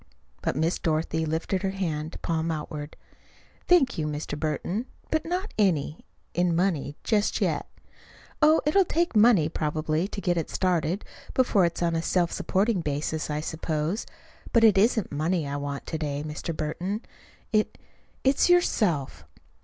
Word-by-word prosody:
But -, -, -1 dB
Miss 160 Hz, +4 st, 0 dB
Dorothy 160 Hz, 0 st, 0 dB
lifted 165 Hz, +4 st, -1 dB
her 195 Hz, -, 0 dB
hand, 165 Hz, -5 st, -3 dB
palm 165 Hz, 0 st, 0 dB
outward. 150 Hz, -1 st, -5 dB, 0.7 s
"Thank 295 Hz, -, +4 dB
you, 155 Hz, -, 0 dB
Mr. 150 Hz, 0 st, -4 dB
Burton; 160 Hz, -, -2 dB, 0.2 s
but 315 Hz, -, +1 dB
not 365 Hz, +4 st, -2 dB
any 165 Hz, -6 st, +1 dB, 0.3 s
in 175 Hz, -1 st, +2 dB
money, 165 Hz, -5 st, 0 dB
just 210 Hz, -2 st, +1 dB
yet. -, -, 0 dB, 0.7 s
Oh, 310 Hz, +1 st, +6 dB
it'll 345 Hz, +6 st, +5 dB
take 340 Hz, -5 st, 0 dB
money, 210 Hz, -7 st, +6 dB
probably, 155 Hz, +2 st, -1 dB
to 205 Hz, -, -6 dB
get 175 Hz, -3 st, 0 dB
it 165 Hz, -, -2 dB
started, 180 Hz, +1 st, 0 dB, 0.3 s
before 225 Hz, -8 st, +4 dB
it's 170 Hz, +1 st, -1 dB
on 170 Hz, -1 st, +1 dB
a 165 Hz, -, +1 dB
self 175 Hz, 0 st, +1 dB
supporting 195 Hz, 0 st, +1 dB
basis, 150 Hz, +1 st, -2 dB
I 150 Hz, 0 st, -1 dB
suppose. 160 Hz, +4 st, -2 dB, 0.4 s
But 230 Hz, -, +4 dB
it 220 Hz, -3 st, +7 dB
isn't 220 Hz, +1 st, +2 dB
money 155 Hz, +2 st, 0 dB
I 140 Hz, +1 st, -3 dB
want 140 Hz, -1 st, -4 dB
to 160 Hz, -, -4 dB
day, 145 Hz, -1 st, -2 dB
Mr. 155 Hz, +1 st, -5 dB
Burton. 180 Hz, +8 st, -2 dB, 0.5 s
It 215 Hz, 0 st, +1 dB, 0.5 s
it's 270 Hz, +5 st, +3 dB
yourself." 210 Hz, -, +2 dB
170 Hz, 155 wpm, -26 LUFS, 155-210 Hz, 0.7 s, it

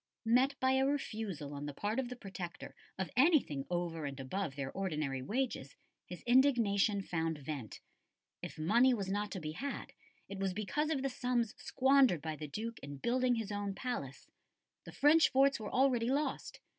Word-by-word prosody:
Met 255 Hz, +4 st, +3 dB
by 260 Hz, 0 st, +3 dB
a 265 Hz, 0 st, +3 dB
refusal 215 Hz, -, -3 dB
on 145 Hz, +1 st, -5 dB
the 145 Hz, -, -6 dB
part 210 Hz, +4 st, -1 dB
of 255 Hz, -2 st, -2 dB
the 250 Hz, -, -6 dB
Protector 190 Hz, -6 st, -7 dB, 0.2 s
of 190 Hz, -1 st, -3 dB
anything 255 Hz, -, +3 dB
over 170 Hz, -3 st, -2 dB
and 140 Hz, 0 st, -7 dB
above 140 Hz, +3 st, -3 dB
their 140 Hz, -1 st, -4 dB
ordinary 150 Hz, -8 st, -2 dB
wages, 220 Hz, -, -2 dB, 0.3 s
his 180 Hz, -, -9 dB
indignation 230 Hz, -6 st, +3 dB
found 165 Hz, -3 st, -2 dB
vent. 140 Hz, -6 st, -6 dB, 0.6 s
If -, -, -7 dB
money 235 Hz, +11 st, +4 dB
was 195 Hz, -4 st, -3 dB
not 205 Hz, +1 st, -1 dB
to 190 Hz, -, -4 dB
be 155 Hz, -2 st, -4 dB
had, 270 Hz, -, -5 dB, 0.3 s
it 200 Hz, 0 st, -7 dB
was 195 Hz, -1 st, 0 dB
because 295 Hz, +9 st, -1 dB
of 280 Hz, -4 st, -1 dB
the 275 Hz, -, +1 dB
sums 245 Hz, -4 st, -1 dB
squandered 265 Hz, -, +3 dB
by 160 Hz, -1 st, -3 dB
the 150 Hz, 0 st, -6 dB
Duke 220 Hz, +10 st, -5 dB
in 140 Hz, 0 st, -8 dB
building 250 Hz, -, +1 dB
his 220 Hz, -2 st, -3 dB
own 205 Hz, -1 st, -3 dB
palace. 195 Hz, -, -5 dB, 0.6 s
The -, -, -9 dB
French 315 Hz, +3 st, +5 dB
forts 275 Hz, 0 st, +3 dB
were 210 Hz, -2 st, -6 dB
already 250 Hz, -3 st, +3 dB
lost. 290 Hz, +3 st, -2 dB
210 Hz, 180 wpm, -34 LUFS, 160-255 Hz, 0.6 s, French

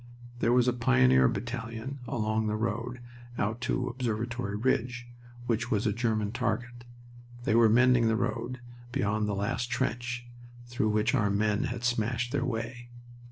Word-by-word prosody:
There 115 Hz, -, +2 dB
was 125 Hz, 0 st, +4 dB
a 125 Hz, -, +3 dB
Pioneer 65 Hz, -, +4 dB
battalion 115 Hz, -, -4 dB
along 110 Hz, -1 st, 0 dB
the 105 Hz, -, 0 dB
road 115 Hz, +2 st, -3 dB, 0.4 s
out 110 Hz, +3 st, -1 dB
to 125 Hz, +1 st, 0 dB
Observatory 120 Hz, -3 st, -2 dB
Ridge, 120 Hz, +1 st, 0 dB, 0.4 s
which 115 Hz, -1 st, 0 dB
was 105 Hz, -1 st, +1 dB
a 105 Hz, -, +2 dB
German 110 Hz, -2 st, 0 dB
target. 120 Hz, 0 st, -3 dB, 0.6 s
They 110 Hz, -, +1 dB
were 115 Hz, -1 st, +6 dB
mending 125 Hz, +1 st, +5 dB
the 115 Hz, -, +3 dB
road 125 Hz, +2 st, -2 dB, 0.3 s
beyond 105 Hz, -1 st, 0 dB
the 105 Hz, -, -1 dB
last 115 Hz, +5 st, -1 dB
trench, 120 Hz, -1 st, -2 dB, 0.4 s
through 120 Hz, -3 st, -1 dB
which 105 Hz, +2 st, +2 dB
our 105 Hz, -7 st, +2 dB
men 105 Hz, +1 st, +1 dB
had 120 Hz, -1 st, -4 dB
smashed 120 Hz, 0 st, 0 dB
their 140 Hz, -2 st, 0 dB
way. 120 Hz, 0 st, -4 dB
115 Hz, 155 wpm, -29 LUFS, 110-120 Hz, 0.6 s, were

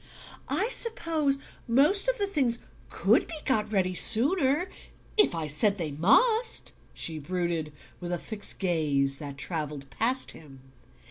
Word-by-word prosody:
"I 435 Hz, -, 0 dB
suppose 330 Hz, -, 0 dB, 0.3 s
most 295 Hz, -, +4 dB
of -, -, +1 dB
the 405 Hz, -, +1 dB
things 270 Hz, -12 st, -1 dB, 0.3 s
COULD -, -, +1 dB
be -, -, -6 dB
got 215 Hz, -5 st, 0 dB
ready 185 Hz, -3 st, 0 dB
sooner 285 Hz, -, +4 dB, 0.5 s
if 420 Hz, -, +3 dB
I 165 Hz, -1 st, -3 dB
said 195 Hz, +8 st, +2 dB
they 165 Hz, -5 st, -4 dB
MUST," 440 Hz, -, +2 dB, 0.2 s
she 160 Hz, -2 st, -4 dB
brooded, 170 Hz, -1 st, -3 dB, 0.3 s
with 175 Hz, 0 st, -6 dB
a 175 Hz, -, -1 dB
fixed 210 Hz, +4 st, 0 dB
gaze 145 Hz, -7 st, 0 dB
that 140 Hz, -2 st, -8 dB
travelled 150 Hz, -3 st, -5 dB
past 255 Hz, +4 st, 0 dB
him. 135 Hz, -4 st, -14 dB
205 Hz, 140 wpm, -27 LUFS, -, 0.5 s, most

